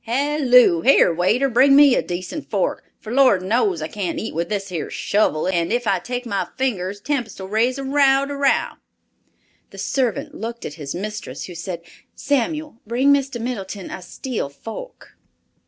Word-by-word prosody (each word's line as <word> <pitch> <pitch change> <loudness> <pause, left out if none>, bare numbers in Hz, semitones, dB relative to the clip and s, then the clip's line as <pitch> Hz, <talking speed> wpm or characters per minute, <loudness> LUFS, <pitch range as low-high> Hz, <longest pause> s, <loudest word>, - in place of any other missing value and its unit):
Halloo! 250 - +4
Here 260 -8 +5
waiter, 210 +11 +2
bring 265 +3 +5
me 285 -2 +7
a - - +2
decent 180 - -6
fork, - - -1
for 220 - -7
Lord 255 -9 +4
knows 200 -5 +1
I - - -2
can't 185 0 -4
eat 220 - -4
with 170 +2 -2
this 200 -2 -3
here 170 -4 -4
shovel 200 -7 0
and 170 -1 0
if 240 +1 0
I 195 -3 +2
take 245 +6 -5
my 200 -4 -2
fingers 205 -7 -2
Tempest'll 230 -6 -3
raise 230 +6 +1
a 275 - -4
row 275 0 +3
de - - -9
dow." 275 - +1 0.9
The - - -14
servant 280 +3 -1
looked 235 -5 -6
at - - -5
his 145 -2 -6
mistress, 215 +4 -5
who 180 - -9
said, 175 0 -6 0.3
"Samuel, 290 0 -2
bring 260 +5 +3
Mr. 270 -3 -1
Middleton 205 -5 -5
a - - -6
steel 210 - -5
fork." 225 - -10
230 Hz, 170 wpm, -21 LUFS, 185-270 Hz, 0.9 s, me